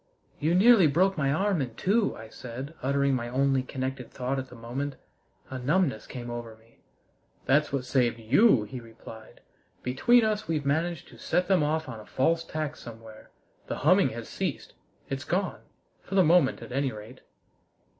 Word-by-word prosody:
"You 160 Hz, +4 st, +1 dB
nearly 200 Hz, -2 st, +7 dB
broke 185 Hz, +7 st, +2 dB
my 140 Hz, -3 st, +1 dB
arm 190 Hz, +1 st, +1 dB
in 120 Hz, -4 st, -4 dB
two," 205 Hz, -, +1 dB
I 110 Hz, 0 st, -10 dB
said, 130 Hz, +6 st, -8 dB
uttering 140 Hz, +1 st, +1 dB
my 120 Hz, -2 st, -2 dB
only 135 Hz, +1 st, +2 dB
connected 130 Hz, -1 st, -5 dB
thought 130 Hz, +1 st, -2 dB
at 130 Hz, -, -6 dB
the 125 Hz, -, -12 dB
moment. 125 Hz, +5 st, -4 dB, 0.6 s
A 130 Hz, -, -4 dB
numbness 140 Hz, -, 0 dB
came 120 Hz, -2 st, -7 dB
over 120 Hz, -2 st, -6 dB
me. 115 Hz, +1 st, -26 dB, 0.7 s
"That's 150 Hz, +3 st, +3 dB
what 135 Hz, -2 st, -2 dB
saved 125 Hz, -3 st, +1 dB
you!" 125 Hz, -, +4 dB
he 115 Hz, +5 st, -7 dB
replied. 115 Hz, -1 st, -13 dB, 0.4 s
"Between 225 Hz, -, +4 dB
us, 215 Hz, 0 st, -1 dB
we've 155 Hz, -3 st, -1 dB
managed 165 Hz, +4 st, -1 dB
to -, -, -15 dB
set 180 Hz, 0 st, 0 dB
them 190 Hz, -4 st, +3 dB
off 155 Hz, +1 st, 0 dB
on 115 Hz, -4 st, -7 dB
a 105 Hz, -, -12 dB
false 165 Hz, +5 st, +1 dB
tack 155 Hz, -2 st, -4 dB
somewhere. 115 Hz, -1 st, -12 dB, 0.4 s
The -, -, -3 dB
humming -, -, +5 dB
has -, -, -7 dB
ceased. -, -, -4 dB, 0.3 s
It's 135 Hz, -1 st, -4 dB
gone 185 Hz, +3 st, -2 dB, 0.4 s
for 195 Hz, -, -6 dB
the 190 Hz, -, +6 dB
moment 165 Hz, -4 st, +3 dB
at -, -, -10 dB
any 135 Hz, +1 st, 0 dB
rate!" 110 Hz, +4 st, -11 dB
135 Hz, 175 wpm, -27 LUFS, 120-165 Hz, 0.7 s, nearly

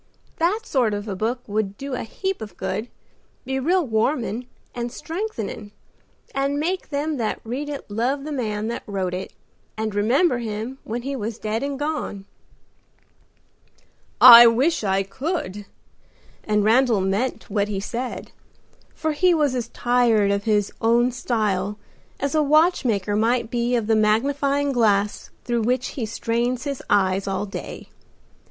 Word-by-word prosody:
That 365 Hz, +7 st, +1 dB
sort 245 Hz, -, +1 dB
of 205 Hz, +1 st, -5 dB
a 200 Hz, -, -3 dB
book 230 Hz, +6 st, -2 dB
would 205 Hz, -1 st, -2 dB
do 275 Hz, 0 st, -6 dB
a 250 Hz, -, -2 dB
heap 380 Hz, -, -4 dB
of 205 Hz, -5 st, -8 dB
good; 220 Hz, +4 st, -3 dB, 0.6 s
be 265 Hz, +1 st, -2 dB
real 350 Hz, +5 st, +2 dB
warmin' 230 Hz, +1 st, -1 dB, 0.3 s
and 240 Hz, -1 st, -4 dB
strengthening 300 Hz, -, -5 dB, 0.6 s
and 275 Hz, +1 st, 0 dB
make 365 Hz, +5 st, -2 dB
them 295 Hz, +1 st, -2 dB
that 225 Hz, -3 st, -2 dB
read 260 Hz, +6 st, -4 dB
it 285 Hz, -1 st, -6 dB
love 245 Hz, +7 st, -1 dB
the 305 Hz, -, -5 dB
man 215 Hz, -6 st, -2 dB
that 235 Hz, -, -4 dB
wrote 190 Hz, -3 st, -2 dB
it, 185 Hz, +1 st, -5 dB, 0.5 s
and 215 Hz, -1 st, -2 dB
remember 245 Hz, -, +2 dB
him 225 Hz, +3 st, -5 dB
when 235 Hz, +2 st, -4 dB
he 275 Hz, +1 st, -3 dB
was 225 Hz, -2 st, -4 dB
dead 220 Hz, +1 st, -2 dB
and 280 Hz, 0 st, -3 dB
gone." 290 Hz, -9 st, -3 dB, 1.9 s
"I 240 Hz, -1 st, +11 dB
wish 260 Hz, +6 st, +2 dB
I 195 Hz, -1 st, +1 dB
could!" 205 Hz, -, -4 dB, 0.8 s
and 210 Hz, -1 st, +2 dB
Randal 230 Hz, -1 st, +3 dB
meant 200 Hz, +7 st, -1 dB
what 205 Hz, 0 st, +1 dB
he 205 Hz, -2 st, -3 dB
said, 240 Hz, +5 st, -5 dB, 0.6 s
for 315 Hz, -, -1 dB
he 355 Hz, +3 st, +3 dB
was 295 Hz, -4 st, +2 dB
as 245 Hz, -3 st, -2 dB
tired 235 Hz, -4 st, +2 dB
of 200 Hz, 0 st, -1 dB
his 210 Hz, -2 st, +1 dB
own 235 Hz, +2 st, +3 dB
style 210 Hz, -5 st, -1 dB, 0.4 s
as 280 Hz, 0 st, -1 dB
a 310 Hz, -, +3 dB
watch 310 Hz, +4 st, +3 dB
maker 205 Hz, -4 st, 0 dB
might 230 Hz, +2 st, +1 dB
be 240 Hz, 0 st, 0 dB
of 230 Hz, -3 st, 0 dB
the 220 Hz, +1 st, +2 dB
magnifying 275 Hz, +6 st, +1 dB
glass 210 Hz, -5 st, +1 dB
through 240 Hz, -1 st, 0 dB
which 250 Hz, +3 st, 0 dB
he 235 Hz, -5 st, -4 dB
strains 235 Hz, +3 st, -1 dB
his 280 Hz, -2 st, -4 dB
eyes 195 Hz, -1 st, +2 dB
all 195 Hz, +1 st, -1 dB
day. 200 Hz, -, -8 dB
235 Hz, 155 wpm, -23 LUFS, 210-275 Hz, 1.9 s, I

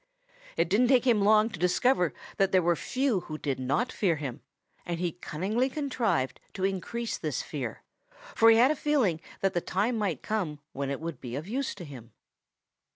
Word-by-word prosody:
It 165 Hz, -, +2 dB
didn't 220 Hz, +8 st, +3 dB
take 255 Hz, -1 st, +4 dB
him 230 Hz, -5 st, +4 dB
long 215 Hz, +2 st, +4 dB
to 175 Hz, -, -8 dB
discover 180 Hz, -, +2 dB, 0.3 s
that 195 Hz, -1 st, +2 dB
there 185 Hz, -2 st, +4 dB
were 170 Hz, 0 st, +3 dB
few 260 Hz, -, 0 dB
who 155 Hz, -3 st, -7 dB
did 140 Hz, -4 st, -2 dB
not 140 Hz, -, 0 dB
fear 180 Hz, -6 st, +1 dB
him, 140 Hz, -5 st, -5 dB, 0.4 s
and 170 Hz, -1 st, -4 dB
he 175 Hz, -1 st, 0 dB
cunningly 190 Hz, -, -1 dB
contrived 250 Hz, -, -1 dB, 0.2 s
to 190 Hz, -, -4 dB
increase 220 Hz, +5 st, -3 dB
this -, -, -2 dB
fear, -, -, -5 dB, 0.5 s
for 225 Hz, -, +6 dB
he 225 Hz, -, +7 dB
had 250 Hz, +5 st, +6 dB
a -, -, 0 dB
feeling 260 Hz, -, +1 dB, 0.2 s
that 195 Hz, -, +1 dB
the 175 Hz, -, 0 dB
time 215 Hz, +8 st, 0 dB
might 185 Hz, -10 st, -1 dB
come 185 Hz, -9 st, -2 dB, 0.2 s
when 140 Hz, 0 st, -3 dB
it 140 Hz, -, -3 dB
would 165 Hz, -4 st, -6 dB
be 125 Hz, -1 st, -5 dB
of 150 Hz, +5 st, -5 dB
use 265 Hz, +5 st, -2 dB
to 175 Hz, -, -8 dB
him. 120 Hz, -6 st, -11 dB
190 Hz, 195 wpm, -28 LUFS, 160-235 Hz, 0.5 s, he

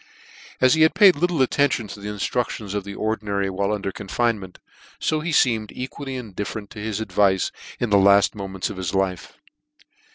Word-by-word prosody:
As 130 Hz, 0 st, +5 dB
he 160 Hz, -, +2 dB
had 160 Hz, -, +5 dB
paid 200 Hz, -4 st, +7 dB
little 165 Hz, -2 st, +1 dB
attention 130 Hz, -4 st, +1 dB
to 100 Hz, -, -8 dB
the 105 Hz, +1 st, -6 dB
inftruc 105 Hz, +4 st, -1 dB
tions 100 Hz, -3 st, -6 dB
of 100 Hz, -1 st, -3 dB
(lie 100 Hz, -, -5 dB
Ordinary 100 Hz, -3 st, -1 dB
while 100 Hz, +2 st, -1 dB
under 100 Hz, -2 st, -2 dB
confinement, 100 Hz, -1 st, -2 dB, 0.4 s
fo 155 Hz, -, 0 dB
he 165 Hz, +3 st, -3 dB
feemed 115 Hz, -8 st, +2 dB
equally 135 Hz, +1 st, -6 dB
indifferent 105 Hz, -3 st, -6 dB
to 105 Hz, -, -9 dB
his 110 Hz, 0 st, -3 dB
advice 100 Hz, -3 st, +1 dB, 0.3 s
in 120 Hz, -3 st, -1 dB
the 100 Hz, -, +6 dB
laft 100 Hz, +1 st, +5 dB
moments 95 Hz, -2 st, -4 dB
of 95 Hz, -, -8 dB
his 95 Hz, 0 st, -3 dB
life. 95 Hz, -2 st, -2 dB
105 Hz, 185 wpm, -23 LUFS, 100-125 Hz, 0.4 s, paid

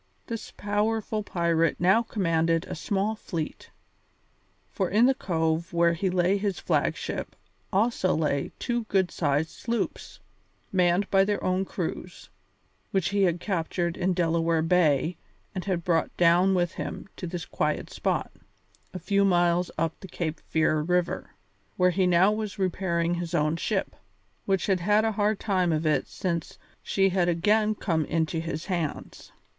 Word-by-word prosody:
This 230 Hz, -2 st, -6 dB
powerful 215 Hz, +1 st, -1 dB
pirate 170 Hz, -4 st, +1 dB
now 190 Hz, +6 st, +4 dB
commanded 165 Hz, -7 st, 0 dB
a -, -, -6 dB
small 200 Hz, +6 st, -1 dB
fleet, 170 Hz, -7 st, -5 dB, 1.0 s
for 190 Hz, -3 st, -1 dB
in 220 Hz, +5 st, +4 dB
the 265 Hz, -, +5 dB
cove 165 Hz, -6 st, -1 dB
where 170 Hz, 0 st, +3 dB
lay 185 Hz, +2 st, +1 dB
his 200 Hz, -1 st, -2 dB
flag -, -, 0 dB
ship -, -, -5 dB, 0.4 s
also 200 Hz, -2 st, +2 dB
lay 150 Hz, -3 st, 0 dB
two 240 Hz, -2 st, -2 dB
good 190 Hz, -4 st, +1 dB
sized 150 Hz, 0 st, 0 dB
sloops, 235 Hz, 0 st, -4 dB, 0.5 s
manned 180 Hz, +1 st, +2 dB
by 195 Hz, -1 st, +5 dB
their 205 Hz, +1 st, -1 dB
own 185 Hz, +1 st, +1 dB
crews, 175 Hz, -, -6 dB, 0.6 s
which 190 Hz, -2 st, 0 dB
he 200 Hz, 0 st, +1 dB
had 175 Hz, -2 st, +2 dB
captured 170 Hz, -2 st, -2 dB
in 185 Hz, 0 st, 0 dB
Delaware 165 Hz, -1 st, +1 dB
Bay 165 Hz, -1 st, +2 dB, 0.4 s
and 185 Hz, -2 st, -4 dB
had 180 Hz, -3 st, -1 dB
brought 165 Hz, -2 st, 0 dB
down 180 Hz, +3 st, +4 dB
with 175 Hz, -1 st, +1 dB
him -, -, -6 dB
to 180 Hz, -, -5 dB
this 170 Hz, 0 st, -5 dB
quiet 150 Hz, 0 st, -2 dB
spot, -, -, -1 dB, 0.6 s
a -, -, -1 dB
few 200 Hz, +3 st, +1 dB
miles 175 Hz, -2 st, +3 dB
up 165 Hz, 0 st, -1 dB
the 190 Hz, -, -9 dB
Cape 160 Hz, -3 st, -4 dB
Fear 155 Hz, -1 st, +1 dB
River, 180 Hz, +2 st, -1 dB, 0.4 s
where 180 Hz, 0 st, +3 dB
now 185 Hz, +1 st, +4 dB
he 215 Hz, -, -1 dB
was 215 Hz, -1 st, -4 dB
repairing 175 Hz, -3 st, 0 dB
his 175 Hz, 0 st, -3 dB
own 155 Hz, 0 st, +2 dB
ship, 195 Hz, +4 st, -2 dB, 0.5 s
which 195 Hz, -2 st, +1 dB
had 190 Hz, -2 st, +1 dB
had 210 Hz, +5 st, +3 dB
a 225 Hz, -, +2 dB
hard 210 Hz, 0 st, 0 dB
time 185 Hz, -4 st, +1 dB
of 155 Hz, 0 st, 0 dB
it 155 Hz, -1 st, +1 dB
since 170 Hz, -3 st, -3 dB, 0.2 s
she 195 Hz, 0 st, +2 dB
had 180 Hz, -2 st, +1 dB
again 210 Hz, +5 st, +2 dB
come 165 Hz, -6 st, 0 dB
into 160 Hz, +1 st, -1 dB
his 160 Hz, -1 st, -4 dB
hands. 170 Hz, -6 st, -4 dB
180 Hz, 155 wpm, -27 LUFS, 165-195 Hz, 1.0 s, the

